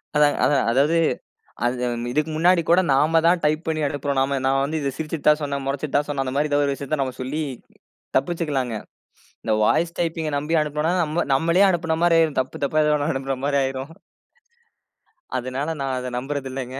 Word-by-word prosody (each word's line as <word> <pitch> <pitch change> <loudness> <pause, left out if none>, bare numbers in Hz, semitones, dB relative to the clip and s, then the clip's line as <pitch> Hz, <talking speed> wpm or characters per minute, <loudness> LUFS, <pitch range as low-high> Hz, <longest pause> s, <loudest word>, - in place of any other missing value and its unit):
அதாங்க, 150 0 +4
அது 145 - +3 0.2
அதாவது, 145 +6 +3 0.7
அது 125 0 0 0.3
இதுக்கு 155 +4 0
முன்னாடி 175 +1 +4
கூட 175 +2 +6
நாம 155 +4 +3
தான் 175 0 +3
டைப் 155 +2 0
பண்ணி 155 -1 -1
அனுப்புறோம். 140 -1 -2 0.3
நான் 135 0 +2
வந்து 155 +2 -2
இத 140 - -1
சிரிச்சுட்டு 155 -1 -4
தான் 150 +1 +3
சொன்னேன், 140 -2 -3
முறைச்சுட்டு 140 +1 -3
தான் 145 - 0
சொன்னேன், 140 -2 -1
அந்தமாரி 140 +4 -1
ஏதாவது 145 0 +2
ஒரு 140 - 0
விஷயத்த 140 +1 -3
நம்ம 130 -1 -5
சொல்லி 140 +5 -3 0.8
தப்பிச்சுக்கிலாங்க. 140 -6 -1 0.7
இந்த 110 - -1
வாய்ஸ் 170 +9 +1
டைப்பிங் 165 -2 -1
அ - - -8
நம்பி 150 +3 -2
அனுப்பினனா 155 +4 0 0.3
நம்மளே 170 +7 +3
அனுப்பினமாரி 170 0 +2
ஆயிரும். 155 -4 +1
தப்பு 130 - -5
தப்பா 155 +2 +1
ஏதோ 150 - +3
1 145 +1 -1
அனுப்புறமாரி 135 +1 -1
ஆயிரும். 135 +2 -4 1.5
அதனால, 130 +4 -3
நான் 135 -1 -1
அத 125 - -5
நம்புறது 135 +1 -4
இல்லங்க 130 -1 -5
145 Hz, 170 wpm, -23 LUFS, 135-160 Hz, 1.5 s, கூட